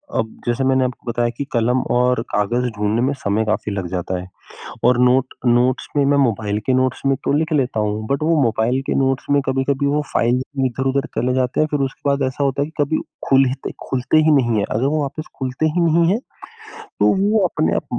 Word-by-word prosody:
अब 110 Hz, -, -2 dB
जैसे 120 Hz, +2 st, 0 dB
मैंने 130 Hz, 0 st, +2 dB
आपको 125 Hz, -1 st, -5 dB
बताया 120 Hz, 0 st, 0 dB
कि 140 Hz, -, -3 dB
कलम 120 Hz, +2 st, +2 dB
और 125 Hz, -1 st, +2 dB
कागज़ 120 Hz, +5 st, 0 dB
ढूँढ़ने 105 Hz, +2 st, 0 dB
में 135 Hz, +3 st, +1 dB
समय 105 Hz, +2 st, 0 dB
काफ़ी 110 Hz, 0 st, -1 dB
लग 95 Hz, -3 st, -3 dB
जाता 90 Hz, 0 st, -2 dB
है, 90 Hz, -, -8 dB, 0.6 s
और 125 Hz, +1 st, +4 dB
नोट 125 Hz, +1 st, +2 dB
नोट्स 125 Hz, +2 st, +2 dB
में 145 Hz, -, +3 dB
मैं 145 Hz, +1 st, +3 dB
मोबाइल 110 Hz, -5 st, 0 dB
के 130 Hz, -, +2 dB
नोट्स 130 Hz, 0 st, 0 dB
में 135 Hz, -, +3 dB
तो -, -, +1 dB
लिख 160 Hz, +1 st, -1 dB
लेता 130 Hz, -6 st, 0 dB
हूँ। 105 Hz, +1 st, -2 dB
बट 140 Hz, +2 st, -1 dB
वो 165 Hz, +1 st, +2 dB
मोबाइल 120 Hz, +2 st, +1 dB
के -, -, 0 dB
नोट्स 135 Hz, -1 st, 0 dB
में 145 Hz, 0 st, +4 dB
कभी-कभी 135 Hz, +1 st, 0 dB
वो 145 Hz, +1 st, +1 dB
फाइल 120 Hz, +2 st, +2 dB, 0.3 s
इधर-उधर 135 Hz, +2 st, -1 dB
चले 125 Hz, +1 st, +1 dB
जाते 130 Hz, -1 st, 0 dB
हैं 155 Hz, -, +3 dB
फिर 145 Hz, -, 0 dB
उसके 135 Hz, +1 st, -5 dB
बाद 140 Hz, 0 st, +1 dB
ऐसा 130 Hz, +2 st, -2 dB
होता 140 Hz, 0 st, 0 dB
है -, -, 0 dB
कि 160 Hz, -1 st, -2 dB
कभी 155 Hz, +3 st, -1 dB, 0.3 s
खुल 135 Hz, 0 st, +5 dB
हित 130 Hz, +1 st, -5 dB, 0.2 s
खुलते 125 Hz, +3 st, 0 dB
ही 155 Hz, 0 st, +4 dB
नहीं 120 Hz, -5 st, +2 dB
हैं। 100 Hz, -, +1 dB
अगर 115 Hz, +5 st, 0 dB
वो 150 Hz, +1 st, 0 dB
वापस 145 Hz, +3 st, -5 dB
खुलते 130 Hz, +3 st, -1 dB
ही 155 Hz, +3 st, 0 dB
नहीं 170 Hz, 0 st, +3 dB
हैं 205 Hz, -, +2 dB, 0.8 s
तो -, -, +4 dB
वो 210 Hz, +2 st, +3 dB
अपने 155 Hz, -2 st, 0 dB
आप -, -, -2 dB
130 Hz, 225 wpm, -20 LUFS, 120-140 Hz, 0.8 s, खुल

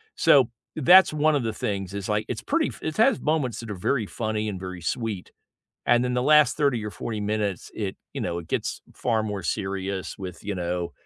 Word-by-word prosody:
So, 140 Hz, -8 st, +5 dB, 0.3 s
that's 180 Hz, +6 st, +7 dB
one 155 Hz, 0 st, +3 dB
of 135 Hz, -, 0 dB
the 110 Hz, -, -1 dB
things, 100 Hz, -2 st, -3 dB
is, 100 Hz, -1 st, -4 dB
like, 105 Hz, +1 st, +1 dB
it's 120 Hz, -, -3 dB
pretty 315 Hz, +2 st, +1 dB
f -, -, -8 dB
it 155 Hz, -, -2 dB
has 230 Hz, +2 st, +5 dB
its -, -, -12 dB
moments 140 Hz, -8 st, 0 dB
that 115 Hz, -2 st, -6 dB
are -, -, -4 dB
very 110 Hz, +5 st, 0 dB
funny 110 Hz, 0 st, -2 dB
and 95 Hz, -3 st, -5 dB
very 90 Hz, -2 st, -7 dB
sweet, 110 Hz, 0 st, -3 dB, 0.6 s
and 120 Hz, 0 st, +4 dB
then 125 Hz, 0 st, -1 dB
the 125 Hz, -, +1 dB
last 150 Hz, +1 st, +5 dB
30 140 Hz, -7 st, +1 dB
or 105 Hz, -, -3 dB
40 110 Hz, +2 st, -5 dB
minutes, 105 Hz, -3 st, -2 dB
it 100 Hz, -3 st, -3 dB, 0.2 s
you -, -, -4 dB
know, 85 Hz, -, -2 dB
it 85 Hz, -, -9 dB
gets -, -, -2 dB
far 115 Hz, -3 st, 0 dB
more 105 Hz, -3 st, -3 dB
serious 95 Hz, 0 st, -3 dB
with, 90 Hz, -3 st, -7 dB
you 100 Hz, -1 st, -2 dB
know, 90 Hz, 0 st, -2 dB
110 Hz, 225 wpm, -25 LUFS, 95-130 Hz, 0.6 s, that's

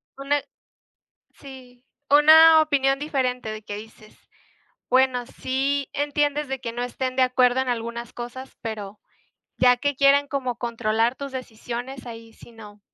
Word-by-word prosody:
Una 280 Hz, +1 st, -1 dB, 1.0 s
sí, 260 Hz, -2 st, -14 dB, 0.2 s
una 315 Hz, +2 st, +7 dB
opinión 275 Hz, -3 st, +1 dB
diferente 255 Hz, -6 st, -2 dB
de 215 Hz, -1 st, -8 dB
que 205 Hz, 0 st, -6 dB
dices. 215 Hz, 0 st, -14 dB, 0.7 s
Bueno, 255 Hz, -1 st, +2 dB
sí 270 Hz, +2 st, -2 dB
entiendes 290 Hz, 0 st, -1 dB
de 270 Hz, 0 st, -3 dB
que 230 Hz, -3 st, -5 dB
no 240 Hz, +1 st, -4 dB
estén 255 Hz, +1 st, -4 dB
de 260 Hz, -, +3 dB
acuerdo 255 Hz, 0 st, +3 dB
en 260 Hz, -, -2 dB
algunas 235 Hz, 0 st, -4 dB
cosas, 245 Hz, +2 st, -8 dB
pero 210 Hz, -3 st, -6 dB, 0.6 s
ya 250 Hz, -1 st, +5 dB
que 285 Hz, +3 st, -1 dB
quieren 280 Hz, +1 st, +4 dB
como 255 Hz, -4 st, -3 dB
controlar 230 Hz, 0 st, -1 dB
tus 280 Hz, -1 st, -8 dB
decisiones, 245 Hz, +1 st, -7 dB
ahí 225 Hz, -1 st, -10 dB
si -, -, -16 dB
no. 210 Hz, -2 st, -14 dB
255 Hz, 145 wpm, -23 LUFS, 235-275 Hz, 1.0 s, una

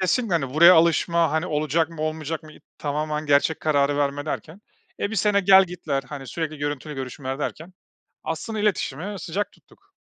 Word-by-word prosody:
kesinlikle, 190 Hz, +1 st, +1 dB
hani, 135 Hz, -4 st, -1 dB
buraya 170 Hz, +3 st, +8 dB
alışma, 170 Hz, 0 st, +3 dB
hani, 160 Hz, +2 st, 0 dB
olacak 155 Hz, +1 st, 0 dB
mı, 155 Hz, -2 st, -6 dB
olmayacak 155 Hz, 0 st, -3 dB
mı, 155 Hz, -1 st, -13 dB
y -, -, -17 dB, 0.2 s
tamamen 150 Hz, +1 st, -2 dB
gerçek 145 Hz, +2 st, +2 dB
kararı 145 Hz, -2 st, +2 dB
verme 145 Hz, +1 st, -1 dB
derken. 160 Hz, +5 st, -5 dB, 0.4 s
E, 205 Hz, -, -1 dB
1 220 Hz, -, -4 dB
sene 200 Hz, +1 st, +3 dB
gel-gitler, 180 Hz, -7 st, +3 dB
hani, 135 Hz, +1 st, -8 dB
sürekli 155 Hz, -1 st, -4 dB
görüntülü 145 Hz, +1 st, -4 dB
görüşmeler 135 Hz, +1 st, -5 dB
derken 165 Hz, +4 st, -5 dB, 0.5 s
aslında 185 Hz, +7 st, -4 dB
iletişimi 195 Hz, -1 st, -1 dB
sıcak 195 Hz, +5 st, -3 dB
tuttuk. -, -, -25 dB
155 Hz, 165 wpm, -24 LUFS, 145-175 Hz, 0.5 s, buraya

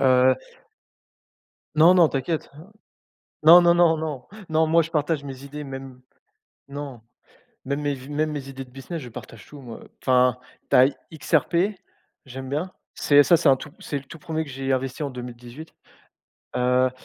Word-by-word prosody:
heu 130 Hz, -1 st, +5 dB, 1.4 s
Non, 165 Hz, +4 st, +6 dB
non, 175 Hz, -3 st, +6 dB
t'inquiète. 145 Hz, +4 st, -3 dB, 0.9 s
Non, 170 Hz, +3 st, +9 dB
non 170 Hz, 0 st, +4 dB
non, 170 Hz, -2 st, +4 dB
non, 150 Hz, -5 st, -5 dB, 0.2 s
non, 160 Hz, 0 st, +3 dB
moi, 165 Hz, +1 st, +4 dB
je 165 Hz, -, -5 dB
partage 150 Hz, -2 st, -1 dB
mes 135 Hz, -1 st, -8 dB
idées, 145 Hz, +1 st, -8 dB
même 135 Hz, -2 st, -9 dB, 0.7 s
non. 140 Hz, -4 st, -7 dB, 0.6 s
Même 140 Hz, +2 st, -2 dB
mes 145 Hz, -1 st, -1 dB
v 130 Hz, 0 st, -11 dB
même 155 Hz, +1 st, -1 dB
mes 140 Hz, -2 st, -6 dB
idées 135 Hz, 0 st, -7 dB
de 125 Hz, -, -20 dB
business, 135 Hz, +6 st, -7 dB
je 125 Hz, -, -9 dB
partage 115 Hz, -1 st, -11 dB
tout, 145 Hz, -1 st, -12 dB
moi, 120 Hz, -3 st, -9 dB
heu. -, -, -15 dB
Enfin, 125 Hz, -1 st, +3 dB, 0.3 s
tu -, -, +5 dB
as 130 Hz, +2 st, +7 dB, 0.2 s
XRP. 160 Hz, +1 st, 0 dB, 0.7 s
J'aime 130 Hz, 0 st, -8 dB
bien. 155 Hz, +7 st, -3 dB, 0.2 s
C'est 145 Hz, 0 st, +5 dB
ça 170 Hz, +4 st, +5 dB
c'est 160 Hz, -2 st, +2 dB
un 135 Hz, -, +6 dB
tout 150 Hz, -, -10 dB
c'est 145 Hz, -, -4 dB
le 140 Hz, -, -13 dB
tout 165 Hz, -, -12 dB
1er 160 Hz, +1 st, -3 dB
que 145 Hz, -, -11 dB
j'ai 135 Hz, 0 st, -3 dB
investi 130 Hz, +2 st, -2 dB
en 140 Hz, -, -2 dB
2018. 125 Hz, +4 st, -10 dB, 0.8 s
Heu, 125 Hz, +1 st, +2 dB
140 Hz, 175 wpm, -24 LUFS, 130-155 Hz, 1.4 s, Non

